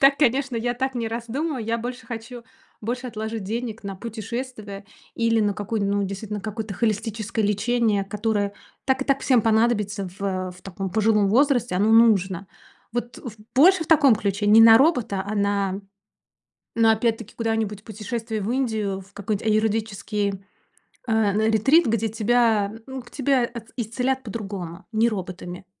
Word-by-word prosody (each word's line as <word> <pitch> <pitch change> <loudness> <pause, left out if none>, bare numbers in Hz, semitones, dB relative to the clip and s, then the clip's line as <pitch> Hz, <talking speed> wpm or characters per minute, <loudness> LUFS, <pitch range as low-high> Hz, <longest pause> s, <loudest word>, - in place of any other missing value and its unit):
так, 275 0 +6
конечно, 270 -2 +2
я 240 +2 -1
так 265 +2 -2
не 230 -2 -2
раздумываю. 240 +4 -3
Я 230 +1 -1
больше 245 +2 -6
хочу 235 +1 -7 0.4
больше 245 +4 -3
отложить 220 -1 -4
денег 225 +2 -4
на 195 -1 -5
путешествие 220 -1 -6 0.3
или 230 -1 +2
на 205 -1 +1
какую 210 +2 -3
ну, 200 0 +1
действительно, 200 +2 -4
на - - -10
какое-то 215 -1 -5
холистическое 220 +1 -1
лечение, 210 0 +1
которое 205 0 -1 0.3
так 265 0 +1
и - - -11
так 275 0 +1
всем 255 -4 +3
понадобится 215 -3 +1
в 185 -2 -2
в 180 - -17
таком 195 0 -5
пожилом 210 0 +3
возрасте. 250 -3 +2
Оно 205 +4 +2
нужно. 195 -5 +4 0.5
Вот, 240 0 -4
в 235 -4 -8 0.2
больше 325 +5 +6
в - - -13
таком 285 -6 +6
ключе. 205 -1 -1
Не 215 +2 +7
на 225 0 +9
робота, 240 - +2
а 215 - -3
на 200 -1 0 0.9
на 225 -1 +5
опять-таки 225 -1 -1
куда-нибудь 225 -3 -2
путешествие 220 +1 -5
в 210 +4 -2
Индию, 220 -7 -1
в 195 +1 -17
какой-нибудь 205 +1 -3
аюрведический 210 -2 -1 0.6
а, 220 -3 +2
на 220 +2 +2
ретрит, 270 - +4
где 225 0 +1
тебя, 220 -1 +2
м, 265 0 -6
к 245 - -17
тебя 270 -2 +1
от 235 -1 -6
исцелят 250 +3 -1
по-другому, 195 -5 -6
не 225 +1 +3
роботами. 185 -3 -5
220 Hz, 160 wpm, -24 LUFS, 205-240 Hz, 0.9 s, на